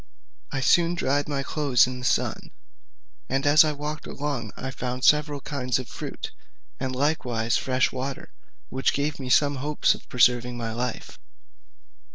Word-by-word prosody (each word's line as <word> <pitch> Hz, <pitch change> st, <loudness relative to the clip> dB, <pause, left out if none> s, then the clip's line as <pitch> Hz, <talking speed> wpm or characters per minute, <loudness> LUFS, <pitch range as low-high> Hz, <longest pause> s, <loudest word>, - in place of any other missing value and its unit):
I 135 Hz, -, -2 dB
soon 170 Hz, +5 st, +4 dB
dried 145 Hz, -3 st, 0 dB
my 140 Hz, -2 st, -1 dB
clothes 140 Hz, -4 st, +3 dB
in 125 Hz, 0 st, -5 dB
the 125 Hz, -, -6 dB
sun, -, -, 0 dB, 0.8 s
and 135 Hz, +2 st, 0 dB
as 145 Hz, +2 st, +7 dB
I 155 Hz, -, +1 dB
walked 150 Hz, +1 st, -5 dB
along 140 Hz, -7 st, -4 dB
I 130 Hz, -, -4 dB
found 125 Hz, 0 st, -4 dB
several 150 Hz, -1 st, +3 dB
kinds 130 Hz, -4 st, -1 dB
of 130 Hz, -2 st, -6 dB
fruit, -, -, -6 dB, 0.5 s
and 130 Hz, -1 st, -3 dB
likewise 125 Hz, -5 st, 0 dB
fresh 130 Hz, 0 st, +1 dB
water, 130 Hz, +1 st, -5 dB, 0.4 s
which 130 Hz, 0 st, 0 dB
gave 145 Hz, +1 st, -1 dB
me 130 Hz, -2 st, -5 dB
some 145 Hz, +1 st, +3 dB
hopes 150 Hz, +3 st, +2 dB
of -, -, -13 dB
preserving 125 Hz, -1 st, +3 dB
my 115 Hz, -2 st, -3 dB
life. 125 Hz, 0 st, -4 dB
135 Hz, 160 wpm, -25 LUFS, 125-145 Hz, 0.8 s, as